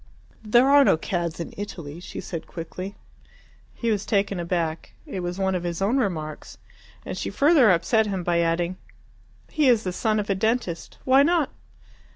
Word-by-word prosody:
"There 240 +4 +4
are 285 0 +7
no 210 - +4
cads 170 0 -3
in 170 - -6
Italy," 170 -6 -7
she 180 - -8
said 170 -3 -6
quickly. 185 +4 -7 0.8
He 230 -2 -1
was 205 -2 0
taken 200 -3 0
aback. 170 -2 -2
It 190 - -5
was 175 0 -4
one 190 -1 0
of 180 - -1
his 170 -1 -3
own 205 +7 +1
remarks. 160 - -3 0.5
And - - -4
she - - -3
further 285 -5 +5
upset 215 +5 +3
him 190 -3 -2
by 170 0 +1
adding, 170 +2 0 0.7
"He 300 -4 +3
is 230 -3 +4
the 185 - -3
son 215 +2 0
of 205 - -3
a 195 - +2
dentist. 200 -4 -2
Why 265 +1 +6
not?" 320 -1 +2
190 Hz, 180 wpm, -24 LUFS, 170-225 Hz, 0.8 s, are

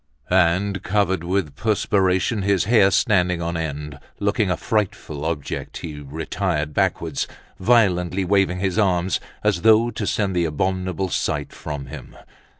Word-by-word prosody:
_" - - +4
And, 95 +2 +2
covered 95 -3 0
with 85 -5 -1
perspiration, 100 0 +1
his 100 -2 +2
hair 105 -3 +5
standing 90 -3 +2
on 85 0 -3
end, 75 -3 -4 0.2
looking 100 0 +1
a 90 - 0
frightful 100 - -2
object, 80 -4 -4
he 75 -3 -7
retired 75 +1 -3
backwards, - - 0 0.3
violently 95 -4 +2
waving 95 -1 +2
his 95 +1 0
arms, 95 -3 +2 0.2
as 105 -5 +1
though 110 +2 +5
to 105 -2 -4
send 100 -3 0
the 85 -1 +2
abominable 95 +4 -1
sight 75 -4 -2
from 75 -3 -6
him. - - -10
95 Hz, 145 wpm, -22 LUFS, 85-100 Hz, 0.3 s, hair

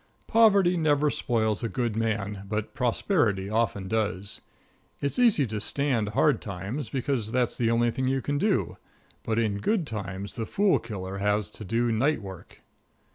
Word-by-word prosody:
Poverty 200 -6 +4
never 150 -2 +2
spoils 110 -4 0
a 115 - -1
good 120 -3 -2
man, 105 -3 -2
but 105 0 -3
prosperity 120 - +1
often 110 -3 0
does. 100 -2 -1 0.6
It's 140 - -2
easy 225 - +5
to 110 -2 -4
stand 120 -2 0
hard - - +3
times, 100 +8 -5
because 125 -5 -2
that's 125 -1 +1
the 115 -2 +1
only 115 0 +2
thing 130 +2 -2
you 135 +1 +1
can 145 +2 -2
do, 205 +2 0 0.4
but 110 -1 -2
in 105 -3 0
good 205 - +1
times 100 -4 -5
the 115 -2 -4
fool 200 -1 +2
killer 100 -4 -6
has 105 -1 0
to - - -9
do 115 +3 0
night 135 +8 +2
work. 95 -3 -11
115 Hz, 165 wpm, -27 LUFS, 105-140 Hz, 0.6 s, easy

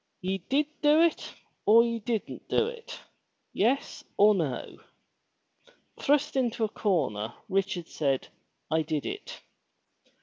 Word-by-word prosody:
Ye 190 +1 -2
did 290 +3 +3 0.2
do 300 +1 +5
it 335 -2 0 0.3
or 225 +3 +7
ye 230 -1 -1
didn't 220 0 -4
do - - +2
it, 470 0 -8 0.3
— - - -49 0.2
yes 250 +7 0
or 210 +1 +7
no." 155 -10 -3 1.2
Thrust 295 +1 +2
into 240 -3 0
a 215 - +1
corner, 120 - -1
Richard 190 -3 -1
said, 135 -4 -1 0.4
*'I 160 0 +3
did 155 -2 -2
it." 410 +1 -6
215 Hz, 130 wpm, -28 LUFS, 170-275 Hz, 1.2 s, or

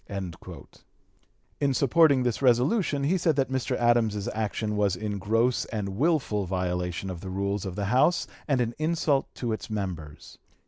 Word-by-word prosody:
In 140 -2 +1
supporting 140 0 +4
this 120 0 -1
resolution 140 - +2
he 180 +7 +2
said 160 -3 +2
that 135 -1 0
Mr. 130 -1 -1
Adams's 115 -4 +2
action 110 0 -2
was 100 -3 +1
in 105 +1 -4
gross 115 +5 +1
and 105 -3 -4
wilful 110 - 0
violation 90 0 -2
of 85 -2 -7
the 95 - -6
rules 100 +1 -2
of 90 - -6
the 100 0 -2
House 130 - +3 0.2
and 135 -4 +2
an 120 -1 -1
insult 155 -3 +1
to 120 -3 -2
its 110 - -6
members. 90 -8 -6
115 Hz, 155 wpm, -27 LUFS, 100-135 Hz, 0.2 s, supporting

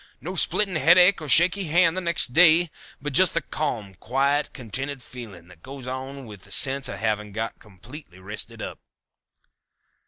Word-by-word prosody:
No 180 +5 -7
splitting 190 0 +1
headache 180 +5 +4
or 150 - -7
shaky 175 +8 +4
hand 165 +1 +2
the 185 - -3
next 170 -7 +1
day, 165 0 +5 0.3
but 145 0 -6
just 185 +6 +4
the - - +1
calm, 110 -10 -5
quiet, 135 +9 -1
contented 135 +2 -6
feeling 105 -9 -12
that 90 -3 -18
goes 135 +2 -10 0.4
with 105 -4 -12
the - - -17
sense 135 -1 +3
of 100 - -6
having 105 -1 -3
got 115 +1 -5
completely 105 - -14
rested 100 +3 -7
up." - - -8
135 Hz, 160 wpm, -23 LUFS, 110-165 Hz, 0.4 s, day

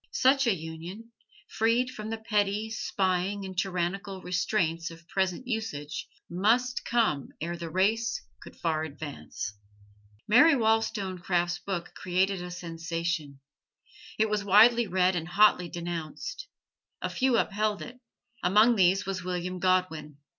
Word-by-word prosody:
Such 270 - +4
a 220 - +3
union, 170 +7 -8 0.4
freed 235 +3 +1
from 215 -2 -7
the 225 - -3
petty, 210 -1 0
spying 195 -1 -1
and 190 -1 -7
tyrannical 190 +1 -2
restraints 170 -2 -1
of 165 0 -14
present 190 +4 -1
usage, 155 - -4 0.2
must 230 +8 +1
come 220 - +1
ere 170 +2 -3
the 170 -1 -6
race 220 +6 +1 0.2
could - - -12
far 160 -2 -1
advance. 145 -7 -6 0.7
Mary 290 +9 +7
Wollstonecraft's 190 -6 0
book 180 -3 -4
created 185 +1 0
a 180 - -6
sensation. 165 -4 -4 0.8
It 220 - +3
was 210 -1 -1
widely 225 +4 +6
read 185 0 +2
and 165 -2 -3
hotly 180 -2 +4
denounced. 170 - -5 0.6
A - - +1
few 260 -2 +1
upheld 210 0 0
it: 245 +1 -10 0.4
among 215 +6 +5
these 190 +1 +4
was 190 -1 -3
William 180 0 -3
Godwin. 175 -6 0
190 Hz, 130 wpm, -28 LUFS, 170-220 Hz, 0.8 s, Mary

